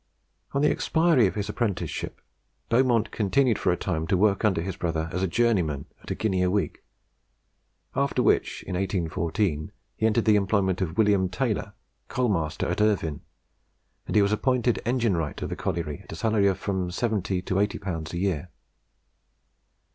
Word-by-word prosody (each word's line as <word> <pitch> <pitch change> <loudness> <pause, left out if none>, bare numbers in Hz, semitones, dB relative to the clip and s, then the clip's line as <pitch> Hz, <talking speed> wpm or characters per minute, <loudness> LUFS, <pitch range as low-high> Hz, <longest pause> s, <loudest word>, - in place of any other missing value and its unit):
On 140 - +1
the - - +5
expiry 160 - +3
of - - -4
his 100 -1 -2
apprenticeship, 100 -8 -3 0.5
Beaumont 120 -2 +3
continued 115 +3 +2
for 90 - +2
a 90 - 0
time 80 -3 -2
to 95 - +2
work 100 +2 +2
under 100 -6 +3
his 90 +2 -3
brother 80 -1 -2
as 90 - -1
journeyman 90 -8 +1 0.2
at - - -12
a - - -1
guinea 95 -4 0
a 90 - +3
week; 100 +1 -1 1.1
after 140 -2 +1
which, - - +1
in - - -6
1814, 85 -3 -1 0.2
he 110 - -1
entered 110 +1 +1
the 105 -2 +5
employment 95 -2 +1
of 80 -3 -2
William 100 -4 +3
Taylor, 90 - -2 0.3
coal 125 -2 0
master 80 -6 -1
at - - -1
Irvine, 90 -7 +1 0.9
and - - -3
he 105 - +6
was 100 - +1
appointed 120 +2 +1
engine 120 -5 +2
wright 80 -4 -3
of - - -3
the - - -3
colliery 75 -4 -3
at - - -13
a - - -5
salary 105 +2 +2
of 95 -1 +1
from 95 -2 -2
70L. 95 -2 -1
to - - -2
80L. 95 -5 -1
a 85 - -4
year. 90 -3 -1
95 Hz, 170 wpm, -26 LUFS, 90-110 Hz, 1.1 s, he